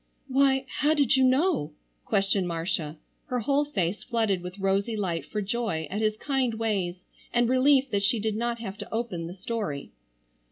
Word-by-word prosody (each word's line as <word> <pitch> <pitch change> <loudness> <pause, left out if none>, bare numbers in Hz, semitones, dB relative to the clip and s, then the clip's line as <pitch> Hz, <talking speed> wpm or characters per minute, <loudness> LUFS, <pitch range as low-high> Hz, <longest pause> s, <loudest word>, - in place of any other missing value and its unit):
"Why, 270 0 +3
how 300 +3 +4
did 285 -5 +3
you 265 - +4
know?" 260 - +2 0.3
questioned 195 -1 +1
Marcia, 165 -2 -2 0.3
her 250 -1 -1
whole 280 +5 +2
face 195 - -1
flooded 220 -6 0
with 180 +2 -7
rosy 200 +3 0
light 175 -5 -2
for 210 -1 -2
joy 205 -6 -1
at 210 +3 -2
his 215 0 +1
kind 265 -4 0
ways 195 -5 -1 0.3
and 240 0 +3
relief 265 +1 +4
that 200 -1 +1
she 220 +3 +2
did 215 0 -1
not 235 +1 -1
have 205 -4 -7
to - - -7
open 220 -8 -2
the 175 - -8
story. 195 -8 -4
220 Hz, 175 wpm, -27 LUFS, 190-255 Hz, 0.3 s, how